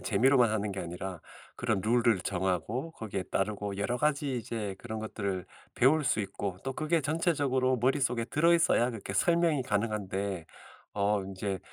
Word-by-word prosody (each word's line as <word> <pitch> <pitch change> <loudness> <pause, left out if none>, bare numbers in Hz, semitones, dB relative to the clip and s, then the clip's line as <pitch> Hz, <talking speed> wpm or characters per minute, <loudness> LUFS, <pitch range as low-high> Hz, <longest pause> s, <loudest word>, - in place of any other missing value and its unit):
재미로만 125 +2 +4
하는 105 -1 -1
게 95 - -5
아니라 90 +1 -6 0.4
그런 110 -4 0
룰을 115 -1 +3
정하고 95 - -2
거기에 100 - -4
따르고 100 +1 -2
여러 110 +5 0
가지 145 -1 0
이제 105 -4 -4
그런 110 -2 -5
것들을 100 -4 -3 0.3
배울 145 +5 +4
수 130 -5 +2
있고 100 -1 -4
또 135 - -3
그게 155 +4 +1
전체적으로 140 -4 +1
머릿속에 125 -1 +1
들어 165 +7 +4
있어야 145 -7 +3
그렇게 110 -4 -6
설명이 165 - +3
가능한데 100 -5 -2 0.5
어 100 0 +1
인제 95 0 -3
110 Hz, 355 characters per minute, -30 LUFS, 100-135 Hz, 0.5 s, 재미로만